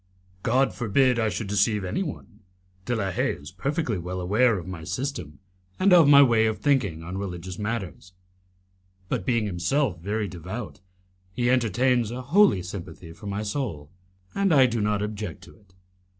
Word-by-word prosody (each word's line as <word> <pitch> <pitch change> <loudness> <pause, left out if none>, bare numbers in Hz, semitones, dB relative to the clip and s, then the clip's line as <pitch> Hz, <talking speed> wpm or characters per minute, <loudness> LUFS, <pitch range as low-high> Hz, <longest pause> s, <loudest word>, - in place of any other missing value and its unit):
"God 130 +5 +2
forbid 125 +2 +2
I 110 -1 +2
should 105 +2 -4
deceive 105 +1 +1
anyone. 120 - -5 0.5
De 120 - -1
la 100 -4 -1
Haye - - 0
is 70 +2 -11
perfectly 125 - -2
well 90 +2 -5
aware 105 +5 +2
of 85 - -7
my 90 -3 -7
system, 90 - -4 0.4
and 185 0 +5
of 170 -4 +7
my 140 0 +9
way 115 -4 +3
of 110 -1 -1
thinking 105 - 0
on 90 +3 -5
religious 90 -1 -6
matters, 105 -4 -5 1.0
but, 115 -8 -2
being 115 -3 +2
himself 95 - 0
very 105 +4 -2
devout, 90 - -7 0.5
he 120 +2 +1
entertains 120 0 +2
a 125 +2 -5
holy 165 - +4
sympathy 85 -3 -8
for 85 +5 -11
my 100 +1 -3
soul, 100 - -4 0.4
and 200 -1 +1
I 135 -4 +6
do 120 -3 -1
not 105 0 0
object 105 -5 -5
to - - -15
it. 100 -3 -26
105 Hz, 165 wpm, -25 LUFS, 90-125 Hz, 1.0 s, my